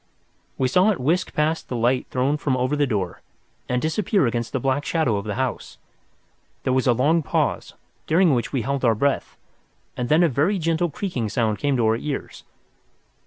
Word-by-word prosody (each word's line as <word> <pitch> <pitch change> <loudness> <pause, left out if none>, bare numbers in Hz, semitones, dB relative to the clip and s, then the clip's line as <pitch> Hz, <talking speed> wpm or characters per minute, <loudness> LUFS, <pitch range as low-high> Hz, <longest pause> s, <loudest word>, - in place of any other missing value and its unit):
We 130 - +1
saw 180 +10 +4
it 205 - 0
whisk 170 +8 0
past 155 +2 0
the 125 - -3
light 120 +2 +1
thrown 135 +3 +1
from 135 -3 -1
over 130 +3 0
the 145 -1 +1
door 95 -7 -3 0.5
and 125 - +1
disappear 185 - +1
against 120 -1 -2
the 135 - -1
black 135 +3 0
shadow 155 -10 0
of 100 - -5
the 105 - -3
house. 130 0 -3 0.9
There 130 - +1
was 130 0 +1
a 125 - +5
long 150 +8 +2
pause, 145 - -1 0.3
during 170 -1 +4
which 120 -2 -1
we 130 -5 -1
held 140 +2 -2
our 115 -3 +4
breath, 140 +5 -1 0.6
and 125 -1 -3
then 160 +3 +5
a - - +5
very 160 - +1
gentle 165 0 0
creaking 140 - -3
sound 110 -1 0
came 145 -2 +1
to 120 - +2
our 110 +1 +2
ears. 140 +3 -5
135 Hz, 195 wpm, -23 LUFS, 120-160 Hz, 0.9 s, a